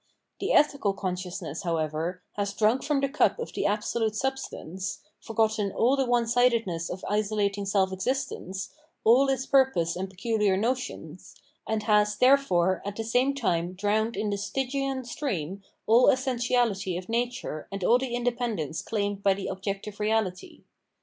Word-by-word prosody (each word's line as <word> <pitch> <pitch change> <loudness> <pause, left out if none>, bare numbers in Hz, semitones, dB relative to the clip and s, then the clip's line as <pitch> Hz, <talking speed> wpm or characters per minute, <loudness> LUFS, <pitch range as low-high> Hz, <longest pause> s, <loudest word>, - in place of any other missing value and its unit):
The - - -1
ethical 280 -9 +3
consciousness, 180 -4 -4
however, 165 +1 -2
has 200 -1 -3
drunk 220 +5 +3
from 290 -2 +1
the 275 - +2
cup 290 +3 +2
of 475 - -6
the - - 0
absolute 215 +1 -1
substance, 215 -8 -4 0.2
forgotten 215 -2 0
all 250 +7 +3
the 270 -2 0
one 240 -1 +2
sidedness 230 -8 +1
of 185 - -6
isolating 205 -1 0
self 190 -1 +2
existence, 195 -3 -3 0.3
all 255 +5 +5
its 265 -1 0
purposes 260 -13 +3
and 190 +2 -4
peculiar 200 0 +1
notions, 250 +5 -3 0.3
and 220 -1 -1
has, 210 -1 +3
therefore, 190 -10 +3
at 205 0 -5
the 225 - -3
same 250 +5 +2
time 175 -8 0
drowned 210 +4 0
in 210 -1 -1
this 200 0 -2
Stygian 270 +3 -2
stream 200 - -3 0.2
all 235 +3 +5
essentiahty 245 -8 +1
of 180 0 -7
nature 235 -9 -2
and 195 -1 -4
all 240 +6 +5
the 255 -2 -3
independence 235 - -2
claimed 205 -2 -2
by 195 -1 +3
the 195 - -6
objective 195 +2 -4
reality. 210 -4 -1
210 Hz, 150 wpm, -27 LUFS, 190-245 Hz, 0.3 s, all